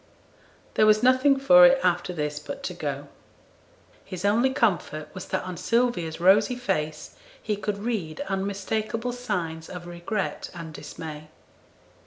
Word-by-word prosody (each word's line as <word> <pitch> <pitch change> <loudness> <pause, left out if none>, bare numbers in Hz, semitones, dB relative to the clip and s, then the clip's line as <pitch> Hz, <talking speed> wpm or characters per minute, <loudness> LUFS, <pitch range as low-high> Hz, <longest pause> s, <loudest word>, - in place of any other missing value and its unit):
There 215 - +4
was 215 +1 +4
nothing 260 +2 +5
for 270 0 +7
it 265 0 +7
after 180 0 +1
this 150 -3 -3
but - - -8
to 180 - -3
go. 145 -4 -4 1.0
His 185 -1 -6
only 230 +6 +3
comfort 180 - -1
was 185 -1 -7
that 190 - -2
on 185 -1 -6
Sylvia's 230 -10 0
rosy 205 +7 +4
face 170 -11 -3 0.2
he 215 - -2
could 205 0 -3
read 200 -8 -3
unmistakable 200 +4 -2
signs 180 -10 -4
of 180 -1 -8
regret 175 +4 -4
and 165 -2 -7
dismay. 155 +1 -8
190 Hz, 140 wpm, -26 LUFS, 165-230 Hz, 1.0 s, for